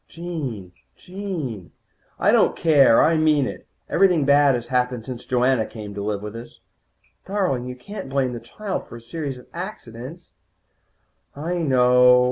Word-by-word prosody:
"Jean, 145 - -6 0.3
Jean 165 - -6 0.2
" - - -39
"I - - +4
don't - - +4
care. 140 -7 +5
I 160 +1 +3
mean 155 -3 +3
it. - - -7 0.2
Everything 180 -7 +3
bad 140 -1 +5
has 120 -1 -5
happened 125 -2 0
since 125 -2 -8
Joanna 125 -2 +2
came 105 -2 -8
to 100 - -5
live 105 0 -3
with 105 +1 -7
us." 115 +1 -10 0.7
"Darling, 185 -11 -1
you 125 - -6
can't 195 +4 -8
blame 130 -2 0
the 120 - -5
child 200 - -5
for - - -11
a - - -8
series 135 +3 -5
of 125 - -14
accidents." 170 - -8 1.0
"I 170 +5 -3
know." 125 -4 +5
130 Hz, 160 wpm, -23 LUFS, 120-165 Hz, 1.0 s, care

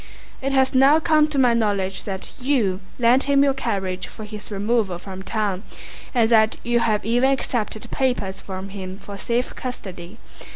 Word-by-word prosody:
It 275 +1 -1
has 265 -1 +3
now 275 +4 +6
come 310 -1 +4
to 305 -2 -4
my 250 -3 +5
knowledge 200 -4 0
that 190 -2 -4
you 240 -9 +1 0.2
lent 245 +2 +4
him 280 0 +4
your 275 -1 +3
carriage 190 -8 -2
for 215 - -10
his 210 0 -7
removal 205 -2 0
from 190 +1 -8
town, 200 -1 -2 0.5
and 230 -2 +4
that 220 -1 +4
you 240 0 +2
have 215 -3 +1
even 245 +4 +3
accepted 230 -5 -2
papers 205 -8 -1
from 190 0 -6
him 190 -1 -7
for 200 0 -9
safe 235 +5 -1
custody. 190 -6 -7
220 Hz, 170 wpm, -22 LUFS, 195-255 Hz, 0.5 s, now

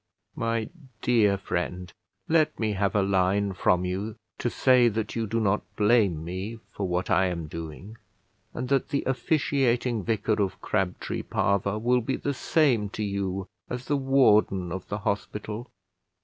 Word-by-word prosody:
My 115 -1 -1 0.4
dear 105 -5 +4
friend, 90 -1 -3 0.3
let 160 -1 +2
me 110 -2 0
have 100 0 0
a 105 - +4
line 95 +1 +1
from 90 -1 +2
you 100 +4 -3 0.2
to 120 - 0
say 125 0 +4
that 110 -3 -2
you 115 -1 -1
do 115 +3 0
not 105 -1 +2
blame 105 -7 +3
me 95 +6 -5
for 100 - -3
what 90 +1 -1
I 95 - +4
am 85 -3 -3
doing, 85 +7 -8 0.5
and 125 - -4
that 135 -1 +1
the 140 - 0
officiating 130 - +1
vicar 110 +1 0
of 95 -1 -1
Crabtree 95 -2 -2
Parva 100 +1 0
will 125 +3 +2
be 130 +3 -1
the 140 - -2
same 130 -7 +2
to 105 - -4
you 100 -1 -2 0.2
as 125 +1 -4
the 145 - +1
warden 110 -9 +3
of 95 0 -5
the 100 - -3
hospital. 105 +3 -3
105 Hz, 160 wpm, -27 LUFS, 95-120 Hz, 0.5 s, dear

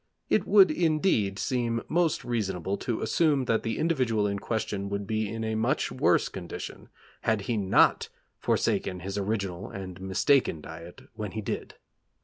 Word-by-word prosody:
It - - +2
would, 195 -5 +7
indeed, 155 - +1
seem 115 -2 -1
most 170 -2 +1
reasonable 95 -6 -1
to 120 -3 -3
assume 150 -6 +2
that 115 -2 +1
the 115 - -2
individual 130 -10 +1
in 100 -1 -1
question 100 -2 -2
would 100 0 -3
be 110 0 -1
in 115 +1 -4
a 110 0 -1
much 110 +1 0
worse - - +3
condition - - -7 0.3
had 110 -2 +1
he 115 +4 -2
not 100 -3 +3 0.3
forsaken 90 -1 0
his 100 +2 -3
original 100 -3 -2
and 95 -2 -7
mistaken 95 - +2
diet 80 +3 -10
when 105 -3 -5
he 110 - -3
did. 100 - -5
110 Hz, 155 wpm, -28 LUFS, 100-120 Hz, 0.3 s, would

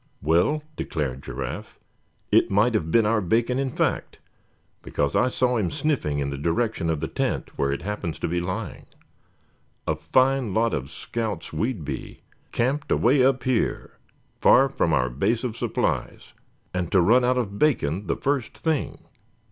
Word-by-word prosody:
"Well," 85 - +2
declared 70 - -3
Giraffe, 65 -1 -6 0.5
"it - - +4
might 105 +5 +3
have 85 -7 0
been 115 +6 +4
our 110 0 +2
bacon, 115 +7 +1
in 135 -1 0
fact; - - -1 0.6
because 70 -1 -1
I 125 - +3
saw 125 -1 +1
him 100 -6 0
sniffing 140 - -1
in 70 0 -2
the 70 - -5
direction 85 +3 0
of 80 -2 0
the 80 - -1
tent - - -2
where 70 0 0
it 70 - -3
happens 95 -6 -3
to - - -2
be 85 +2 0
lying. 90 +1 -5 1.0
A 80 - 0
fine 130 - +2
lot 115 +1 +2
of 70 -1 -3
scouts 115 -3 -4
we'd 110 - -2
be, - - -6 0.3
camped 140 +5 -1
away 130 +2 +4
up 135 0 +2
here, 130 -3 -1 0.4
far 135 +2 +6
from 90 -10 0
our 65 -5 +2
base 100 - 0
of 120 -3 -3
supplies, - - -2 0.4
and 90 -2 -2
to 95 - +5
run 115 +9 +5
out 125 +1 +2
of 100 -5 -2
bacon 100 - +1
the - - +1
first 140 -4 -1
thing. 160 -3 -2
110 Hz, 165 wpm, -25 LUFS, 80-125 Hz, 1.0 s, far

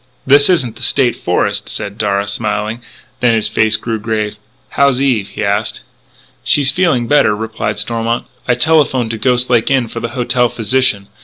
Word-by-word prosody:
"This 140 +3 +5
isn't 130 -11 +1
the - - -13
State 130 -4 +2
Forest," 100 +3 -1
said 105 +1 -5
Darragh, 100 0 0
smiling. 110 +2 -3 0.4
Then 120 -2 +2
his 110 - +2
face 110 -1 +2
grew 115 -2 -4
grave: 105 -1 -3 0.3
"How 140 - +2
is 130 -2 -1
Eve?" 125 -8 0
he - - -5
asked. 100 +2 -2 0.6
"She's 140 -2 +4
feeling 155 -7 +1
better," 115 -5 +3
replied 110 -1 -4
Stormont. 115 +2 -2 0.2
"I 125 - +2
telephoned 130 -4 +1
to 110 - -5
Ghost 125 0 +1
Lake 120 -2 +2
Inn 130 -3 +1
for 115 - -6
the 115 - -4
hotel 125 0 +1
physician.... 115 -3 0
115 Hz, 175 wpm, -14 LUFS, 105-130 Hz, 0.6 s, This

